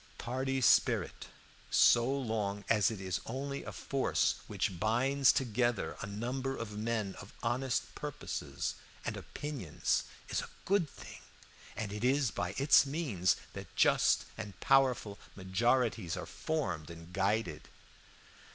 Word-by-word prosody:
"Party 130 +2 -2
spirit, - - +3 0.4
so 120 +2 +5
long 110 -7 -2
as 105 -4 +4
it 110 -4 -5
is 95 -2 -2
only 140 +3 -4
a - - -6
force 135 -1 0
which 90 - -2
binds 130 +5 +4
together 120 -1 0
a - - -4
number 125 +6 -3
of 105 -3 -5
men 110 -2 -1
of 95 - -12
honest 115 -4 -1
purposes 150 -2 -4 0.3
and - - -2
opinions, 140 - -2 0.2
is - - 0
a - - -8 0.2
good 190 -5 +2
thing, - - -11 0.6
and 105 -2 -4
it 105 +2 -5
is 130 -2 +3
by 90 +2 -3
its 140 +2 +6
means 135 - +1 0.2
that - - -9
just - - +4
and 105 -5 -7
powerful 125 -6 +3 0.2
majorities 100 0 +1
are - - -4
formed 90 - -3
and 85 +1 -11
guided. 100 -5 0
115 Hz, 135 wpm, -33 LUFS, 100-135 Hz, 0.6 s, its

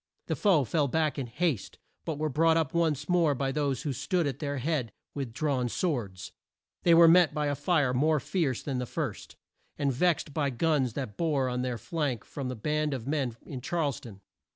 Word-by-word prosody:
The - - -1
foe 185 -9 +3
fell 145 +3 +1
back 155 +1 0
in 130 - -3
haste, 130 - -2 0.3
but 160 -3 -3
were 155 +1 -1
brought 160 +3 +3
up 160 -4 0
once 155 -4 +1
more 170 -5 +3
by 135 +1 -1
those 140 -2 -1
who 145 -4 -1
stood 175 +6 0
at 140 -4 -3
their 145 -2 -2
head 130 -4 -1 0.2
with 135 -5 -4
drawn 130 -1 0
swords. 115 - -2 0.5
They 170 -1 +5
were 165 0 +8
met 165 -2 +6
by 150 -1 0
a 145 - +1
fire 145 -6 +1
more 155 +4 +3
fierce 140 -3 -1
than 135 -3 -2
the 125 - -3
first, - - -4 0.4
and 140 -2 +1
vexed 160 +1 +1
by 145 -2 0
the 130 - -7
guns 145 -4 +1
that 120 -7 -5
bore 145 -6 +1
on 125 0 -2
their 125 -1 -2
flank 145 -6 -2
from 135 -3 -5
the 125 - -4
band 150 +4 -1
of 120 -3 -6
men 135 -5 -1
in 130 -4 -7
Charles 145 -1 -1
town. 100 -5 -12
145 Hz, 210 wpm, -29 LUFS, 125-160 Hz, 0.5 s, were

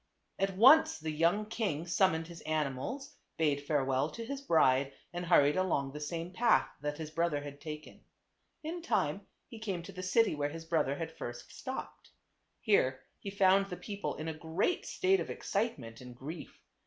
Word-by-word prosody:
At 195 -1 0
once 285 +9 +7
the 155 0 -4
young 170 +7 +2
king 210 -8 -2
summoned 175 -2 +2
his 170 0 -10
animals, 155 - -3 0.2
bade 150 -3 +2
farewell 135 -1 +1
to 230 +5 -7
his 275 +3 -5
bride 140 - +3 0.2
and 175 0 -3
hurried 145 -4 +5
along 165 -7 0
the 150 - -7
same 165 +4 -4
path 230 +4 +4
that 150 0 -3
his 155 -1 -6
brother 160 -3 0
had 145 0 -9
taken. 155 -1 -8 0.6
In 335 +3 -4
time 335 - 0 0.2
he 230 - -10
came 195 -6 -3
to - - -9
the 185 - -7
city 210 +3 +3
where 145 -1 -1
his 165 +2 -8
brother 160 -4 +1
had 160 +2 -4
first 120 0 -7
stopped. 260 - -7 0.5
Here 130 - +3 0.2
he 200 - -6
found 195 0 +4
the 180 -2 -6
people 205 -1 -4
in 155 - -5
a 160 - -2
great 160 - -1
state 385 +1 +2
of - - -4
excitement 125 - -3
and 125 -1 -10
grief. 150 +7 -8
165 Hz, 180 wpm, -32 LUFS, 145-200 Hz, 0.6 s, once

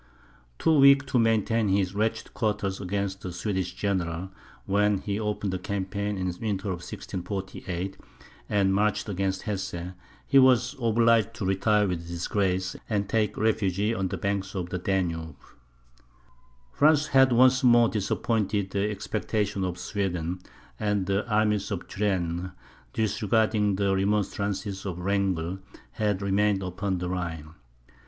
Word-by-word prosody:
Too 160 - +3
weak 140 0 +7
to 130 -2 +1
maintain 115 -1 +2
his 95 -1 +1
wretched 110 +2 -1
quarters 105 -4 -1
against 100 +1 -2
the 90 - -5
Swedish 95 0 -3
general, 95 -2 -2 0.3
when 105 +1 +2
he 100 +2 -3
opened 105 -2 -2
the 95 - -2
campaign 100 +2 -3
in 90 0 -2
the 90 -1 -4
winter 105 -2 -2
of 90 - -2
1648, 95 0 -5 0.5
and 100 -2 +2
marched 105 +3 +1
against 95 -1 -2
Hesse, 95 -4 -4 0.3
he 135 - +5
was 125 0 +4
obliged 115 -1 +3
to 110 -5 -4
retire 105 +2 +2
with 85 -2 -3
disgrace, 90 +2 -1
and 100 -2 0
take 110 0 0
refuge 100 -4 +1 0.2
on 95 -2 -1
the - - -4
banks 100 0 -2
of 90 -2 -3
the 90 - -2
Danube. 85 -5 -1 1.4
France 150 0 +4
had 130 -1 +5
once 130 +2 +5
more 120 -1 +6
disappointed 105 -1 -1
the 100 +1 0
expectations 105 -1 -2
of 90 -1 -3
Sweden; 90 -3 -2 0.4
and 105 -2 0
the 100 +4 -1
army 105 0 +3
of 100 -4 -4
Turenne, 90 -3 -1 0.4
disregarding 105 -1 +1
the 100 0 +1
remonstrances 100 0 -1
of 95 -4 -4
Wrangel, 95 -2 -1 0.3
had 105 -3 -1
remained 100 0 +2
upon 95 +1 -2
the 90 0 -3
Rhine. 80 -4 -4
100 Hz, 140 wpm, -27 LUFS, 95-105 Hz, 1.4 s, weak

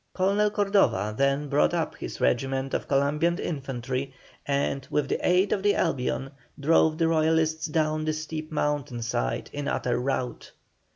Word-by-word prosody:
Colonel 200 +3 +2
Cordova 195 - +2
then 140 +3 +1
brought 145 +4 +2
up 165 -2 -1
his - - -7
regiment 135 - 0
of - - -2
Columbian 150 +5 +2
infantry, 135 -2 -4 0.3
and, 140 -1 -1
with 150 -2 0
the - - -1
aid 185 +2 +3
of 195 - -1
the 205 +1 +3
Albion, 135 -3 -1 0.3
drove 155 +1 +3
the 165 -1 +2
Royalists 160 0 +2
down 155 0 0
the 155 - 0
steep 155 0 -5
mountain 145 -5 -1
side - - -2
in 145 0 -4
utter 120 -1 0
rout. 125 -1 -3
150 Hz, 155 wpm, -26 LUFS, 135-160 Hz, 0.3 s, aid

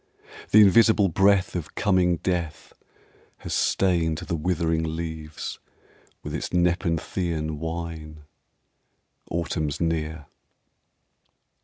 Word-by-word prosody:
The 110 - +7
invisible 105 0 +5
breath 95 +1 +3
of 85 -3 -5
coming 90 -4 +2
death 85 -3 -3 0.6
has - - -6
stained 85 -4 +1
The 85 +2 -4
withering 80 0 0
leaves 80 -2 -6 0.6
with - - -6
its - - -4
nepenthean 85 -2 -1
wine 80 -2 -6 1.1
Autumn's 80 -3 -2
near. 80 -2 -2
85 Hz, 90 wpm, -25 LUFS, 80-90 Hz, 1.1 s, The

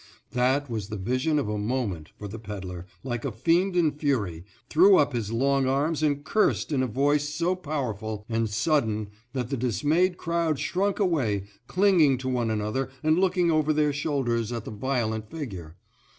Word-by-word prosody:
That 130 +3 +1
was 110 -5 -4
the 105 - -4
vision 130 +10 0
of 145 - 0
a 105 0 -2
moment, 105 -8 -2
for 105 - -7
the 110 +3 -7
pedler, 95 -4 -7 0.2
like 120 -3 -3
a 140 - -2
fiend 170 - +1
in 165 -4 +3
fury, 120 - -1 0.2
threw 185 +4 +6
up 145 -2 +3
his 115 -3 -2
long 135 +3 +2
arms 145 +4 +1
and 145 -2 +1
cursed 215 -1 +1
in 140 -3 +1
a 130 - +1
voice 145 +5 +1
so 170 +5 0
powerful 110 - -4
and 115 -1 0
sudden 110 -2 0 0.2
that 125 -1 -3
the 135 - 0
dismayed 150 - +1
crowd 170 -2 0
shrunk 195 +7 0
away, 135 - +1 0.2
clinging 180 -8 +4
to 130 +1 -4
one 120 -3 0
another 110 +5 -1
and 155 +2 +3
looking 180 -2 +2
over 155 -1 +2
their 150 -1 +2
shoulders 130 -6 -1
at 115 -2 -4
the - - -6
violent 110 -2 -2
figure. 95 - -7
130 Hz, 180 wpm, -26 LUFS, 110-155 Hz, 0.2 s, threw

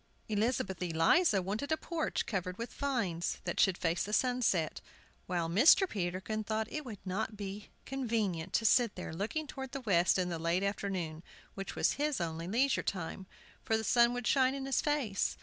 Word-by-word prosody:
Elizabeth 210 -3 0
Eliza 180 - +3
wanted 215 - -3
a 315 - +3
porch 330 -1 -2
covered 180 -3 -3
with 235 +1 -6
vines, 220 -12 -1
that 175 - -3
should 190 -2 +4
face 165 0 0
the 205 - -3
sunset; 235 - +1 0.5
while 175 -3 -1
Mr. 255 - +6
Peterkin 195 - -3
thought 220 +1 -1
it 305 - -3
would 230 -6 -7
not 210 +3 -3
be 200 0 -6 0.2
convenient 220 -10 -1
to 225 - +1
sit 235 0 +4
there 180 -3 -6
looking 225 - -2
towards 265 -2 -7
the 275 - -4
west 185 -7 +3
in 180 -1 0
the 170 -2 -3
late 170 +3 +1
afternoon 190 -5 -2 0.3
(which 195 0 -6
was - - +1
his 300 -5 0
only 165 0 -3
leisure 250 +8 +2
time), 190 0 -4 0.4
for 220 - +1
the 220 - -3
sun 235 +2 +4
would 245 -1 -4
shine 265 0 +3
in 270 -1 -4
his 270 -1 +1
face. 280 -10 0
205 Hz, 185 wpm, -32 LUFS, 180-250 Hz, 0.5 s, Mr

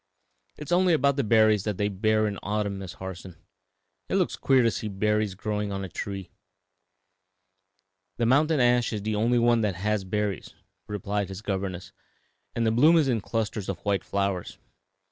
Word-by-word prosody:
"It - - -7
is 150 - -9
only 180 0 +4
about 140 -3 +3
the 140 - +1
red 110 - -5
berries 110 -3 +4
that 105 -3 -2
they 105 - +1
bear 110 +2 +1
in 100 -2 -4
autumn, 100 -1 -2
Miss 95 -2 -7
Harson; 95 -1 -8 0.7
it - - 0
looks - - +1
queer 130 -2 +3
to 115 - +3
see 110 - -4
berries 105 0 0
growing 105 0 -3
on 100 0 -3
a 95 - -6
tree." 95 0 -6 1.9
"The 120 - +1
mountain 150 +5 +3
ash 120 -1 +3
is 105 -2 -4
the 110 +1 -1
only 115 +4 +2
one 120 -1 +3
that 105 -4 0
has 105 +2 -1
berries," 105 0 -3 0.3
replied 105 -1 -3
his 95 +2 -8
governess, 95 -1 -4 0.6
"and 115 - 0
the 110 - +3
bloom 150 +9 +5
is 155 -4 +3
in 115 -4 +1
clusters 110 -2 -3
of 95 - -2
white 100 -3 +1
flowers. 100 -2 -2
105 Hz, 185 wpm, -26 LUFS, 100-115 Hz, 1.9 s, bloom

